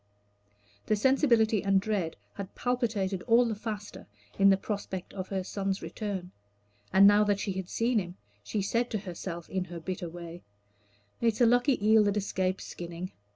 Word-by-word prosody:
The 215 Hz, -, +3 dB
sensibility 230 Hz, -3 st, +3 dB
and 195 Hz, -1 st, +4 dB
dread 195 Hz, -5 st, -2 dB, 0.2 s
had 200 Hz, -2 st, -8 dB
palpitated 220 Hz, -7 st, -1 dB
all 235 Hz, +2 st, +5 dB
the 230 Hz, -, -1 dB
faster 210 Hz, -1 st, -6 dB, 0.3 s
in 195 Hz, 0 st, +7 dB
the 195 Hz, -, +5 dB
prospect 195 Hz, -2 st, -5 dB
of 185 Hz, -2 st, -5 dB
her 190 Hz, -2 st, -2 dB
son's 195 Hz, 0 st, -3 dB
return; 190 Hz, -4 st, -5 dB, 0.6 s
and 195 Hz, +1 st, +7 dB
now 205 Hz, +1 st, +7 dB
that 205 Hz, -1 st, +1 dB
she 205 Hz, -, -2 dB
had 190 Hz, -1 st, -5 dB
seen 230 Hz, 0 st, +1 dB
him, 180 Hz, -2 st, -6 dB, 0.3 s
she 200 Hz, -, -2 dB
said 235 Hz, +5 st, 0 dB
to 220 Hz, -, -1 dB
herself, 175 Hz, -3 st, -6 dB
in 185 Hz, -1 st, -2 dB
her 175 Hz, -1 st, -7 dB
bitter 175 Hz, 0 st, -4 dB
way, 170 Hz, 0 st, -9 dB, 0.8 s
"It 235 Hz, -, +2 dB
is -, -, -4 dB
a -, -, +8 dB
lucky 245 Hz, -2 st, +3 dB
eel 220 Hz, 0 st, +6 dB
that 205 Hz, 0 st, +1 dB
escapes 190 Hz, -2 st, -1 dB
skinning. 175 Hz, +1 st, -7 dB
200 Hz, 175 wpm, -29 LUFS, 185-220 Hz, 0.8 s, a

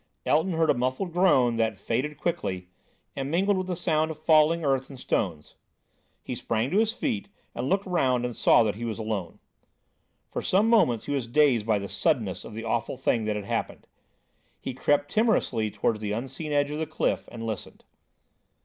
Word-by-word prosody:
Elton 160 Hz, +5 st, +2 dB
heard 160 Hz, -1 st, +3 dB
a -, -, +3 dB
muffled 130 Hz, +9 st, -2 dB
groan 130 Hz, -10 st, +4 dB
that 110 Hz, -3 st, 0 dB
faded 130 Hz, +8 st, -2 dB
quickly, 95 Hz, -, -3 dB, 0.5 s
and 135 Hz, 0 st, -3 dB
mingled 195 Hz, +6 st, +2 dB
with 185 Hz, -1 st, -2 dB
the 180 Hz, -, -2 dB
sound 160 Hz, -2 st, +1 dB
of 160 Hz, -, -6 dB
falling 155 Hz, +1 st, +4 dB
earth 135 Hz, -1 st, +1 dB
and 135 Hz, -3 st, -10 dB
stones. 80 Hz, -10 st, -2 dB, 0.7 s
He -, -, -5 dB
sprang 115 Hz, +4 st, -1 dB
to 200 Hz, -, +3 dB
his 220 Hz, 0 st, +2 dB
feet 225 Hz, -4 st, -3 dB, 0.2 s
and 125 Hz, +2 st, -3 dB
looked 195 Hz, +1 st, +1 dB
round 130 Hz, -9 st, +1 dB
and 120 Hz, -2 st, -4 dB
saw -, -, +5 dB
that 105 Hz, -2 st, 0 dB
he 115 Hz, -, -7 dB
was 115 Hz, -2 st, -3 dB
alone. 105 Hz, -6 st, -4 dB, 0.9 s
For -, -, -3 dB
some 200 Hz, +4 st, +2 dB
moments 205 Hz, -, +3 dB
he -, -, -4 dB
was 135 Hz, -4 st, -2 dB
dazed 120 Hz, -4 st, +3 dB
by 110 Hz, -2 st, +3 dB
the 100 Hz, 0 st, -4 dB
suddenness 115 Hz, -, 0 dB
of -, -, -10 dB
the 115 Hz, -, -5 dB
awful 115 Hz, +3 st, -2 dB
thing 115 Hz, -3 st, 0 dB
that 105 Hz, -1 st, -1 dB
had 105 Hz, -1 st, -4 dB
happened. -, -, -3 dB, 0.7 s
He 130 Hz, -, -5 dB
crept 145 Hz, +3 st, +1 dB
timorously 215 Hz, -, +1 dB
towards 105 Hz, +2 st, -1 dB
the 105 Hz, -1 st, -3 dB
unseen 135 Hz, +7 st, -5 dB
edge 145 Hz, 0 st, +1 dB
of 150 Hz, -, -3 dB
the 160 Hz, -, -2 dB
cliff, 155 Hz, -, -1 dB
and 115 Hz, -1 st, -6 dB
listened. 110 Hz, -3 st, -6 dB
135 Hz, 195 wpm, -27 LUFS, 115-165 Hz, 0.9 s, saw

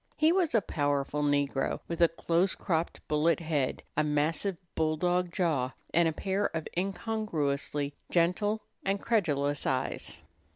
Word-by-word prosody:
He 310 Hz, +1 st, +5 dB
was 350 Hz, -7 st, +2 dB
a 225 Hz, -, +5 dB
powerful 145 Hz, -3 st, -1 dB
negro, 145 Hz, -2 st, +1 dB
with 170 Hz, 0 st, -3 dB
a 170 Hz, -, +8 dB
close 170 Hz, +3 st, +1 dB
cropped 165 Hz, -1 st, -2 dB
bullet 155 Hz, +2 st, +2 dB
head, 155 Hz, -5 st, -1 dB
a 155 Hz, -, +3 dB
massive 155 Hz, +5 st, 0 dB, 0.2 s
bulldog 175 Hz, +3 st, +1 dB
jaw, 155 Hz, -9 st, 0 dB, 0.2 s
and 170 Hz, +1 st, +5 dB
a -, -, +2 dB
pair 195 Hz, +5 st, 0 dB
of 160 Hz, -, -4 dB
incongruously 170 Hz, -8 st, -1 dB, 0.2 s
gentle 205 Hz, +5 st, +2 dB, 0.2 s
and 195 Hz, +1 st, 0 dB
credulous 145 Hz, -11 st, +1 dB
eyes. 130 Hz, -1 st, -2 dB
165 Hz, 135 wpm, -30 LUFS, 145-190 Hz, 0.2 s, a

